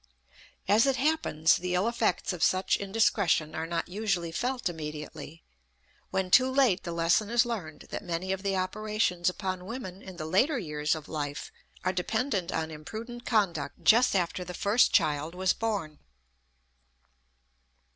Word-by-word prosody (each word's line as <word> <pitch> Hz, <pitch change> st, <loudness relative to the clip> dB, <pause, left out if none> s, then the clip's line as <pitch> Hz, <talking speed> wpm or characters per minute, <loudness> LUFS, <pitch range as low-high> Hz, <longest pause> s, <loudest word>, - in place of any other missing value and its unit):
As 220 Hz, +6 st, +5 dB
it 270 Hz, -, +3 dB
happens, 260 Hz, -, +2 dB
the 180 Hz, 0 st, -2 dB
ill 185 Hz, +5 st, +2 dB
effects 235 Hz, -3 st, 0 dB
of 175 Hz, -, -7 dB
such 185 Hz, +3 st, +3 dB
indiscretion 200 Hz, -6 st, +1 dB
are 160 Hz, +1 st, -3 dB
not 170 Hz, 0 st, -2 dB
usually 180 Hz, -4 st, -1 dB
felt 245 Hz, +6 st, -2 dB
immediately; 155 Hz, -1 st, -7 dB, 0.7 s
when 190 Hz, -1 st, -1 dB
too 255 Hz, +4 st, +6 dB
late 260 Hz, -8 st, +3 dB
the 170 Hz, -, -5 dB
lesson 170 Hz, +5 st, +2 dB
is 240 Hz, +1 st, +3 dB
learned 180 Hz, -11 st, -5 dB
that -, -, -4 dB
many 175 Hz, +2 st, -3 dB
of 190 Hz, 0 st, -2 dB
the 195 Hz, -1 st, 0 dB
operations 185 Hz, -2 st, 0 dB
upon 185 Hz, -1 st, -4 dB
women 195 Hz, -4 st, -7 dB
in 190 Hz, -3 st, -10 dB
the 155 Hz, -, -5 dB
later 250 Hz, -, +2 dB
years 150 Hz, -6 st, -1 dB
of 155 Hz, -1 st, -8 dB
life 145 Hz, -2 st, -4 dB, 0.3 s
are 185 Hz, -, 0 dB
dependent 195 Hz, 0 st, -1 dB
on 160 Hz, 0 st, -2 dB
imprudent 225 Hz, +10 st, -8 dB
conduct 200 Hz, -9 st, 0 dB
just 240 Hz, 0 st, +5 dB
after 180 Hz, 0 st, 0 dB
the 180 Hz, 0 st, -7 dB
first 210 Hz, +7 st, +3 dB
child 155 Hz, -1 st, +1 dB
was 185 Hz, 0 st, +2 dB
born. 200 Hz, -10 st, -3 dB
185 Hz, 155 wpm, -29 LUFS, 165-220 Hz, 0.7 s, too